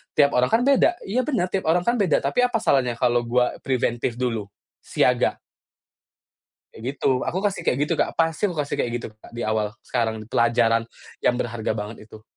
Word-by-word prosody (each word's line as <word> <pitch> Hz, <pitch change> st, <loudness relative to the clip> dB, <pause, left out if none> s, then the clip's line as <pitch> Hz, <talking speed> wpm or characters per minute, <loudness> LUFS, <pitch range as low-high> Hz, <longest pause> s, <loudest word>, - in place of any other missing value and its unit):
tiap 145 Hz, -1 st, +5 dB
orang 125 Hz, -, +4 dB
kan 235 Hz, +2 st, +4 dB
beda." 280 Hz, +5 st, +4 dB
"Iya 250 Hz, +6 st, 0 dB
bener, 225 Hz, -11 st, +1 dB
tiap 190 Hz, -3 st, -1 dB
orang 175 Hz, +2 st, +3 dB
kan 240 Hz, +1 st, +2 dB
beda, 185 Hz, -7 st, +2 dB
tapi 140 Hz, -, 0 dB
apa 245 Hz, -2 st, -2 dB
salahnya 125 Hz, -4 st, +2 dB
kalau 120 Hz, -1 st, +3 dB
gua 125 Hz, +1 st, +1 dB
preventif 120 Hz, -2 st, -1 dB
dulu? 115 Hz, -5 st, -2 dB, 0.3 s
Siaga." -, -, +1 dB, 1.4 s
Kayak 130 Hz, +5 st, -6 dB
gitu. 135 Hz, -, +1 dB, 0.2 s
Aku 185 Hz, +4 st, -2 dB
kasih 200 Hz, -1 st, 0 dB
kayak 125 Hz, -, +2 dB
gitu, -, -, 0 dB
Kak, -, -, 0 dB
pasti 165 Hz, +4 st, +1 dB
aku 175 Hz, -, -5 dB
kasih 140 Hz, -, -4 dB
kayak 120 Hz, -, 0 dB
gitu, 120 Hz, -, -4 dB
Kak, -, -, -15 dB
di 120 Hz, -, -4 dB
awal, 110 Hz, -1 st, -1 dB
sekarang, 110 Hz, -3 st, -2 dB
pelajaran 115 Hz, -1 st, +2 dB, 0.3 s
yang 125 Hz, -, +2 dB
berharga 115 Hz, -3 st, -2 dB
banget 105 Hz, +1 st, -7 dB
itu. 110 Hz, 0 st, -14 dB
125 Hz, 190 wpm, -23 LUFS, 115-175 Hz, 1.4 s, tiap